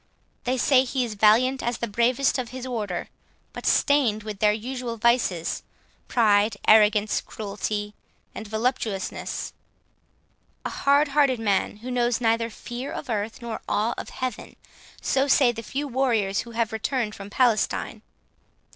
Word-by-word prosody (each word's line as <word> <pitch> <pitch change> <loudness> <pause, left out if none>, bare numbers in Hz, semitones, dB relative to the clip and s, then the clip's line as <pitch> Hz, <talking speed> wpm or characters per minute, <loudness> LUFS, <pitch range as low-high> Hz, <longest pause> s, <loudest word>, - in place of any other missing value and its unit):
They 255 +1 0
say 260 +1 +4
he 255 0 -1
is 225 - -5
valiant 225 +6 +4
as 240 0 -2
the - - -2
bravest 245 +6 +1
of 245 -2 -4
his 260 0 -7
order; 215 -8 -3 0.4
but - - -5
stained 250 -8 +3
with 210 -2 -6
their 210 -1 +4
usual 240 +2 -4
vices, 220 -7 +1 0.5
pride, 210 -3 +3
arrogance, 210 -1 +5
cruelty, 205 0 -4 0.4
and 220 - -7
voluptuousness; 220 -3 -2 1.1
a - - -2
hard 285 +1 +3
hearted 275 -4 +3
man, 205 -1 0
who 255 - -4
knows 240 -1 +1
neither 230 -1 +1
fear 240 +4 -7
of - - -5
earth, 220 +2 -3
nor 230 -1 -5
awe 215 +3 +1
of - - -7
heaven. 255 -3 -5 0.5
So 270 +1 +2
say 265 -3 +5
the 230 -1 -7
few 275 +6 -4
warriors 235 -7 +1
who 235 - -5
have 230 -1 0
returned 220 0 -1
from 200 -1 -9
Palestine. 230 -1 +1
230 Hz, 145 wpm, -25 LUFS, 210-255 Hz, 1.1 s, arrogance